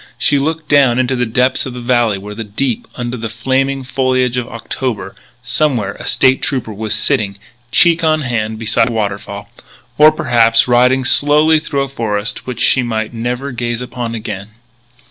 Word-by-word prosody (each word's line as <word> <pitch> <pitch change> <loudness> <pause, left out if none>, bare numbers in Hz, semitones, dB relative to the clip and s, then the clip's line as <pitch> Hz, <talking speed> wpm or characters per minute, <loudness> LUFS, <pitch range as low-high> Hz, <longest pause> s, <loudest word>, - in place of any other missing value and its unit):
She 145 - +2
looked 160 +2 -2
down 140 -4 +4
into 130 +1 +1
the 125 -1 -1
depths 125 +4 +1
of 130 - -7
the 125 - -7
valley 120 -4 +1
where 105 +2 -8
deep 115 +3 -3
under 120 0 -4
the 115 -1 -5
flaming 135 +4 -1
foliage 130 -1 0
of 125 -2 -2
October, 115 -3 -5 0.3
somewhere, 125 -4 0
a - - -7
State 130 0 +3
Trooper 125 -6 -2
was 105 +1 -2
sitting, 105 -2 +1 0.3
cheek 165 +5 +4
on 155 -1 +2
hand, 110 -4 -2
beside 115 +2 +1
a - - -4
waterfall 100 -1 -4 0.5
or, 155 +1 +8
perhaps, 115 -6 +3
riding 125 +2 +3
slowly 150 +4 +4
through 140 -3 -2
a - - -4
forest 115 -4 -3
which 125 -2 -4
she 130 - +4
might 110 -2 -3
never 125 +4 -3
gaze 120 -1 -3
upon 125 -2 -5
again. 100 -3 -6
125 Hz, 170 wpm, -15 LUFS, 110-135 Hz, 0.5 s, or